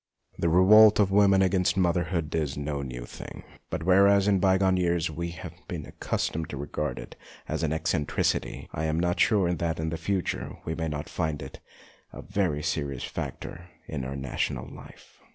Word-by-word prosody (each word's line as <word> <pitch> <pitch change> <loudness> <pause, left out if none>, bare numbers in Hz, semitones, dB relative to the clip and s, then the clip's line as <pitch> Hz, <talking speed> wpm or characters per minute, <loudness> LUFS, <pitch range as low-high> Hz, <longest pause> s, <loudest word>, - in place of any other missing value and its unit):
The 85 - +2
revolt 105 +5 +7
of 100 -2 +3
woman 100 -1 +5
against 95 0 +2
motherhood 85 -2 0
is 75 -4 -1
no 75 -1 -3
new 60 -3 -6
thing; - - -10 0.3
but - - -3
whereas 100 +2 +5
in 100 -2 +3
bygone 95 0 +3
years 85 -2 +1
we 85 +3 -4
have 85 0 -8
been 80 -5 -5
accustomed 80 -1 -3
to 70 - -5
regard 75 +2 -3
it - - -9 0.3
as 80 +1 -2
an 80 -3 0
eccentricity, 80 -1 -1
I 80 - -2
am 80 +1 0
not 90 0 0
sure 95 -6 +3
that 85 -2 -2
in 80 0 -1
the 85 - -2
future 95 +2 -2
we 80 - -2
may 80 0 -2
not 75 -1 -4
find 80 -2 -2
it 70 - -10 0.5
a - - -9
very 75 -7 -1
serious 70 -5 -2
factor 90 +1 -6 0.2
in 75 -4 -4
our 65 +2 -5
national 65 -2 -3
life. - - -14
85 Hz, 180 wpm, -27 LUFS, 75-95 Hz, 0.5 s, revolt